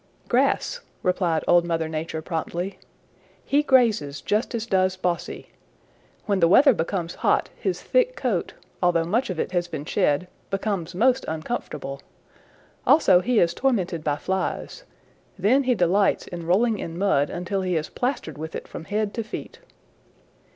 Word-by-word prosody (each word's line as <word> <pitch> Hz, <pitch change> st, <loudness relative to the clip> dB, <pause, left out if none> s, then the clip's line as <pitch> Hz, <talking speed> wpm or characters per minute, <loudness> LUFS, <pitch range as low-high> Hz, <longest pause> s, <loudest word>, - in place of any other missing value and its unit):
"Grass," -, -, +1 dB, 0.2 s
replied 180 Hz, -3 st, +1 dB
Old 175 Hz, 0 st, +5 dB
Mother 165 Hz, -2 st, -1 dB
Nature 160 Hz, 0 st, -4 dB
promptly. 175 Hz, +3 st, -4 dB, 0.7 s
"He 285 Hz, +1 st, +3 dB
grazes 220 Hz, -, +2 dB
just 215 Hz, -, -1 dB
as 230 Hz, -1 st, -2 dB
does 185 Hz, -3 st, +1 dB
Bossy. 175 Hz, -2 st, -3 dB, 0.7 s
When 200 Hz, -2 st, +1 dB
the 170 Hz, -, +5 dB
weather 270 Hz, -, +7 dB
becomes 170 Hz, -1 st, -2 dB
hot -, -, +2 dB
his 380 Hz, -, -3 dB
thick -, -, +2 dB
coat, -, -, -2 dB, 0.3 s
although 175 Hz, -2 st, +3 dB
much 225 Hz, +9 st, 0 dB
of 180 Hz, -3 st, -3 dB
it -, -, -1 dB
has 175 Hz, -1 st, 0 dB
been 155 Hz, -4 st, -6 dB
shed, 180 Hz, -1 st, +1 dB, 0.2 s
becomes 195 Hz, -4 st, -2 dB
most 255 Hz, +6 st, +3 dB
uncomfortable. 155 Hz, -, -4 dB, 0.9 s
Also 190 Hz, -, +6 dB
he 245 Hz, +5 st, 0 dB
is 170 Hz, -4 st, +4 dB
tormented 185 Hz, -, 0 dB
by 145 Hz, -2 st, +1 dB
flies. 190 Hz, -, -3 dB, 0.5 s
Then 245 Hz, +9 st, +3 dB
he 250 Hz, -1 st, +3 dB
delights 190 Hz, +2 st, +2 dB
in 170 Hz, -2 st, -7 dB
rolling 215 Hz, +4 st, +2 dB
in 165 Hz, 0 st, -5 dB
mud 175 Hz, -7 st, +2 dB
until 180 Hz, +3 st, -3 dB
he 185 Hz, -2 st, -1 dB
is 155 Hz, -1 st, -1 dB
plastered 250 Hz, -, -3 dB
with 160 Hz, +1 st, -6 dB
it -, -, -6 dB
from 165 Hz, -, -8 dB
head 210 Hz, +1 st, -1 dB
to 230 Hz, -, -3 dB
feet. 215 Hz, -, -8 dB
185 Hz, 155 wpm, -24 LUFS, 165-220 Hz, 0.9 s, weather